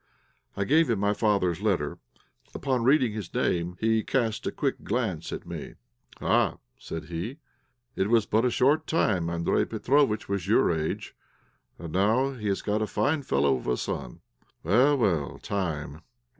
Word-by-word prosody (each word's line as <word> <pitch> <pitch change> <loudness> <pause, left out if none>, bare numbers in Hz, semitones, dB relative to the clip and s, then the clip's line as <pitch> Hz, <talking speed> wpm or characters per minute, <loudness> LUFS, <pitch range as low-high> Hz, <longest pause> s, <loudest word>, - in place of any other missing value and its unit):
I 100 - +1
gave 160 +8 +3
him 115 - +2
my 100 +1 +1
father's 100 -5 +1
letter. 105 -4 0 0.6
Upon 130 -4 0
reading 130 -2 +4
his 105 -4 -6
name 85 +1 -1
he 110 0 +2
cast 115 -5 -1
a - - -1
quick - - -2
glance 105 -8 -2
at - - -6
me. - - -7 0.4
"Ah," - - +2 0.2
said 80 -1 -6
he, 85 - -5 0.6
"it 95 - 0
was 115 -2 +4
but 110 +2 +2
a 125 - +3
short 145 +6 +2
time 95 - +1
Andréj 85 0 0
Petróvitch 115 +1 +1
was 100 -2 -2
your 105 - +4
age, 80 -1 -3 0.6
and 85 -2 -8
now 110 +8 +2
he 115 -6 -5
has 100 -1 -1
got 105 +1 0
a 110 - 0
fine 145 +7 0
fellow 70 - +2
of - - -9
a 60 -1 +1
son. - - -5 0.4
Well, 125 - +4
well 85 - 0
time, 80 -8 -3
time." 80 +3 -13
105 Hz, 170 wpm, -27 LUFS, 85-120 Hz, 0.6 s, reading